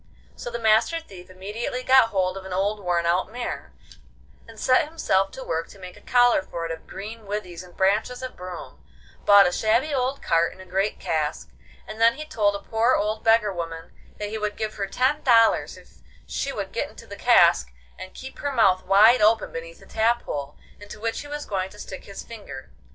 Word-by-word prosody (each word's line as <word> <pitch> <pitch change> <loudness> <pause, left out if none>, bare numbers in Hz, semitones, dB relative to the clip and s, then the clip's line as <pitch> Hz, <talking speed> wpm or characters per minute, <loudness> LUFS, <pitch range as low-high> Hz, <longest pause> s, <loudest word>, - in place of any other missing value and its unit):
So - - -6
the 235 - -4
Master 225 +8 +3
Thief 190 - -13
immediately 210 +7 -5
got 260 -3 +5
hold 185 -1 0
of 195 - -7
an 190 - -9
old 200 +3 0
worn 175 -1 0
out 180 +4 +1
mare, 245 +1 -5 0.8
and 225 -1 -13
set 255 +4 +3
himself 195 -12 +1
to 265 - -7
work 165 -5 -2
to - - -15
make 180 -1 -10
a - - -16
collar 245 -3 +4
for 170 -3 -6
it 165 - -4
of 160 - -8
green 215 +2 -8
withies 185 -4 -5
and 180 -1 -15
branches 215 +6 +1
of 255 - -6
broom; 180 -1 -9 0.4
bought 200 -1 +8
a 180 - +2
shabby 230 +10 +1
old 265 +1 -1
cart 165 0 +2
and - - -19
a 185 - -11
great 195 +3 -1
cask, 155 -2 -2 0.4
and 215 +1 -8
then 230 +1 +5
he 305 - -7
told 205 -8 +1
a 200 - -9
poor 230 +3 +2
old 215 +1 -1
beggar 225 -3 +3
woman 165 -2 -6 0.3
that 210 0 -4
he 220 +1 -4
would 210 -1 -3
give 215 -1 -3
her 200 -1 -3
ten 265 +7 +1
dollars 230 -3 +4
if - - -18 0.3
she - - -3
would - - -5
get - - -2
into - - -14
the - - -9
cask 65 -2 +4 0.3
and 185 - -9
keep 265 0 -10
her 285 - -2
mouth 190 -8 +3
wide 215 +6 +6
open 220 +1 +3
beneath 165 0 -8
the - - -15
tap 230 +2 +1
hole, 145 0 -5 0.2
into 205 +1 -11
which 225 +1 -2
he 290 - -8
was 295 0 -5
going 190 -2 -2
to 210 - -16
stick 190 -2 -9
his 200 - -8
finger. 205 -13 -10
210 Hz, 215 wpm, -24 LUFS, 185-230 Hz, 0.8 s, bought